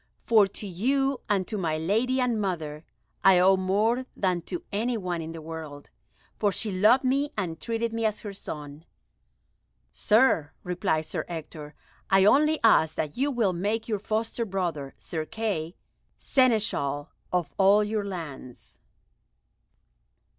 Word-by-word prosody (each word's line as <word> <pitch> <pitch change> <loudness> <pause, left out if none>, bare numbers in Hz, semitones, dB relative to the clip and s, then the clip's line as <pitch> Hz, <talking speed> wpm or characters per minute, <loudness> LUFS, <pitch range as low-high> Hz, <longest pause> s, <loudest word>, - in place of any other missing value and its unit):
For 215 -4 +5
to 200 - -8
you, 265 +9 0
and 195 -3 +1
to 210 - -3
my 160 -4 -1
lady 225 +11 +1
and 240 -4 +1
mother, 160 -6 -3 0.4
I 190 -1 +7
owe 190 +2 +6
more 210 +7 +1
than 180 -3 0
to 175 - -4
any 230 +4 -1
one 180 -4 -3
in 160 0 -6
the 165 -1 -8
world, 155 -3 -8 0.5
for 205 -2 +2
she 210 +2 -2
loved 215 +8 +4
me 275 +3 +1
and 165 -5 -3
treated 230 0 -2
me 230 0 -2
as 215 -1 -1
her 205 -2 -6
son." 150 -4 -8 1.1
"Sir," 210 - +3
replied 180 -3 -1
Sir 155 - -3
Ector, 155 -3 -8 0.3
"I 195 0 +5
only 305 +7 +4
ask 160 -8 +4
that 150 -2 -3
you 275 +4 +1
will 230 -8 +1
make 210 +6 -2
your 215 -3 -1
foster 220 +3 -2
brother, 175 -9 -3
Sir 160 -2 -4
Kay, 190 -4 -3 0.4
Seneschal 210 - +1 0.2
of 180 -3 -1
all 200 +2 +5
your 210 0 -1
lands." 160 -10 -8
195 Hz, 145 wpm, -27 LUFS, 165-225 Hz, 1.1 s, I